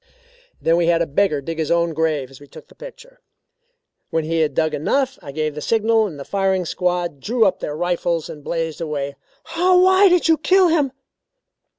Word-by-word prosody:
"Then 165 +1 +2
we 170 -1 +1
had 170 0 +3
a - - -2
beggar 155 -1 0
dig 165 +3 -6
his 155 - -1
own 170 -1 +1
grave 155 -4 -1
as 135 - -14
we 145 - -14
took - - -14
the - - -17
picture. - - -13 0.9
When 165 -2 -1
he 165 +1 -1
had 155 -2 0
dug 160 -1 +1
enough, 265 - -1
I 145 -5 -9
gave 155 +1 -2
the 150 - -7
signal 225 +3 +2
and 155 -7 -9
the 140 - -8
firing 190 -2 0
squad 175 -3 -2
drew 225 - +1
up 190 -2 +1
their 150 - -5
rifles 175 -1 -1
and 150 - -10
blazed 165 0 -3
away." 140 -3 -4 0.4
"Why 370 +3 +5
did 360 -1 +2
you 320 -1 +3
kill 370 +2 +4
him?" 300 -5 +1
170 Hz, 200 wpm, -20 LUFS, 155-240 Hz, 0.9 s, Why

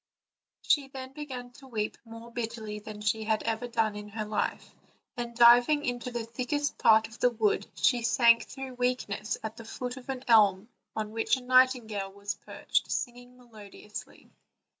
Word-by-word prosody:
She 285 -3 +3
then 265 -1 -8
began 260 -4 -7
to 270 - -14
weep 215 -4 -2
more 230 +1 -11
bitterly 225 -3 -4
than 210 0 -9
she 215 +1 0
had 220 0 +1
ever 225 +2 -2
done 225 -3 0
in 210 0 -7
her 215 +1 -4
life, 210 -1 -2 0.4
and 240 -1 -5
diving 245 +5 +6
into 245 0 -2
the 235 -2 -4
thickest 255 +5 -2
part 220 0 +5
of 225 +1 -15
the 245 - +4
wood, 220 -3 0
she 245 -2 +3
sank 235 0 +4
through 265 -1 -7
weakness 245 -4 -1
at 220 +1 -5
the 230 - -9
foot 250 +3 -5
of 260 +1 -12
an 260 -1 -4
elm 215 -2 +5 0.3
on 215 -1 -3
which 225 +3 +1
a - - -8
nightingale 250 -6 +3
was 200 +1 -4
perched - - -2
singing 245 0 -4
most 245 -1 -20
melodiously. 210 0 -10
235 Hz, 175 wpm, -29 LUFS, 215-250 Hz, 0.4 s, diving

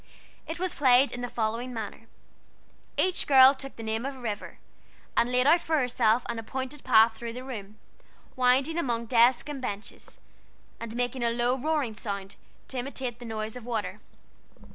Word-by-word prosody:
It 325 - -4
was 370 0 -1
played 260 -1 +4
in 245 - -5
the 245 - -3
following 230 +2 -2
manner: 225 0 -6 0.9
Each 370 -1 +1
girl 265 -1 +8
took 270 0 -9
the 225 - -8
name 220 +1 -2
of 275 +1 -4
a - - -12
river, 215 -4 -5 0.6
and 240 - +2
laid 250 0 +3
out 330 +4 +5
for 320 -1 0
herself 245 -3 +2
an 235 -1 -3
appointed 260 +5 -5
path 225 -2 +6
through 230 0 -6
the 250 +2 -7
room, 215 -5 -8 0.6
winding 265 +6 +2
among 240 -7 -1
the 230 - -13
desks 240 +2 +4
and 290 -3 -5
benches, 205 -4 -7 0.6
and 230 0 -6
making 245 +1 -1
a 235 - +3
low, 240 +2 +1
roaring 285 -3 -1
sound, 200 -3 -6 0.3
to 260 - -4
imitate 250 -2 -5
the 240 - -9
noise 220 0 -4
of 250 - -8
water. 215 -4 -3
245 Hz, 180 wpm, -28 LUFS, 225-265 Hz, 0.9 s, girl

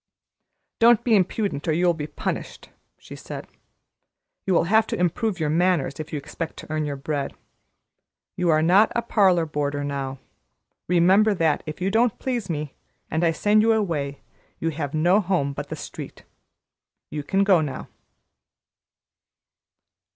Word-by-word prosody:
"Don't 230 -1 +5
be 230 -3 +3
impudent, 190 -4 0
or 160 - +2
you 175 +3 +1
will 175 - +4
be 150 -2 -5
punished," - - -5 0.3
she - - -11
said. - - -8 1.0
"You 185 - +3
will - - +4
have 220 +6 +3
to - - -3
improve 180 +3 0
your 150 -2 0
manners 165 -5 +1
if 155 0 -6
you 150 - -2
expect 160 +3 -6
to - - -10
earn 155 -1 -1
your 145 -1 -3
bread. 140 0 -3 1.0
You 180 -1 0
are 155 -1 +4
not 190 +6 +5
a 235 - 0
parlor 190 -7 +3
boarder 145 -2 -2
now. 140 -1 -4 0.7
Remember 190 +5 +4
that 160 -4 +1
if 155 +4 -6
you 190 +2 0
don't 225 +1 +2
please 240 -7 -3
me, 150 -3 -3 0.4
and 160 +3 0
I 165 - +4
send 210 +6 +3
you 225 +1 +4
away, 155 -10 -2 0.4
you 165 - -1
have 150 -2 -4
no 175 +6 +4
home 170 -7 0
but - - -6
the - - -4
street. - - -9 0.9
You 150 - -3
can 195 +7 +1
go 190 -4 +4
now." 145 -3 -5
170 Hz, 160 wpm, -24 LUFS, 150-195 Hz, 1.0 s, Don't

